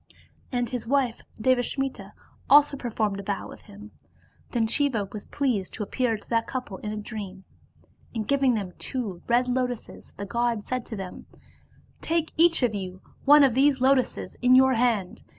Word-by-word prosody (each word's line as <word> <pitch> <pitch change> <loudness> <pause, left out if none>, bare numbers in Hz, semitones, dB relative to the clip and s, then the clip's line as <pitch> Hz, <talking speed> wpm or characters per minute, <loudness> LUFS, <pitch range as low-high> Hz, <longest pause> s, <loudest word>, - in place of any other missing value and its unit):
And 245 -2 0
his 240 -2 -5
wife 260 -3 +1 0.2
Devasmita 260 +3 0 0.4
also 290 0 +6
performed 220 -6 -2
a - - -3
vow 200 0 -3
with - - -12
him; 210 +1 -12 0.6
then 230 -2 0
Siva 235 -4 +1
was 210 - -6
pleased 245 -10 -1
to 215 - -3
appear 230 +1 -1
to - - -17
that 230 -1 0
couple 250 -7 -5
in 210 - -5
a 215 - -4
dream; 200 -2 -7 0.7
and 215 -2 -3
giving 275 -3 +3
them 195 -4 -4
two 215 -10 -4
red 245 +1 +3
lotuses 250 -2 -3
the 200 - -5
god 235 0 -1
said 255 -2 -3
to 225 - -5
them, 190 -3 -8 0.7
"Take 325 -1 -1
each 330 -3 +4
of 235 -3 +2
you 185 -2 -5 0.3
one 295 +1 +8
of 265 -4 +4
these 270 +2 +3
lotuses 260 0 +1
in 250 +1 +6
your 265 0 +6
hand. 225 -6 0
240 Hz, 170 wpm, -26 LUFS, 210-260 Hz, 0.7 s, one